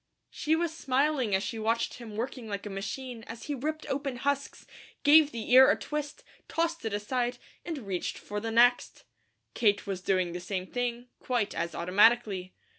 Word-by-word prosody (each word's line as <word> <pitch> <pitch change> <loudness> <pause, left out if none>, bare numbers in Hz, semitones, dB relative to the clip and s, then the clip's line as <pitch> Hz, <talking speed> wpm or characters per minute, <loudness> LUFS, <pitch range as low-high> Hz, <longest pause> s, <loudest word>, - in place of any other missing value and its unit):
She 310 +1 +1
was 325 -1 -1
smiling 270 -6 +1
as 190 - 0
she 225 +3 -4
watched 230 +3 -1
him 225 -3 -9
working 240 +1 -4
like 200 -1 -5
a 205 - -5
machine 230 +5 -5
as 230 0 -8
he 295 - -3
ripped 310 +4 -3
open 275 -1 -2
husks, 280 +3 -2 0.4
gave 295 0 +7
the 230 0 -5
ear 260 +1 +9
a - - +4
twist, 300 0 -5 0.2
tossed 335 +1 -1
it 220 - -2
aside, 245 +3 -1 0.3
and 330 -3 -4
reached 185 -3 -3
for 210 - -5
the 225 +2 -4
next. 240 +2 +3 0.5
Kate 205 -3 +2
was 195 -2 -4
doing 185 -2 +1
the 175 - -5
same 185 0 -4
thing, 245 +2 -3
quite 240 -5 -1
as 170 +1 -3
automatically. 190 +1 +3
235 Hz, 180 wpm, -29 LUFS, 205-275 Hz, 0.5 s, ear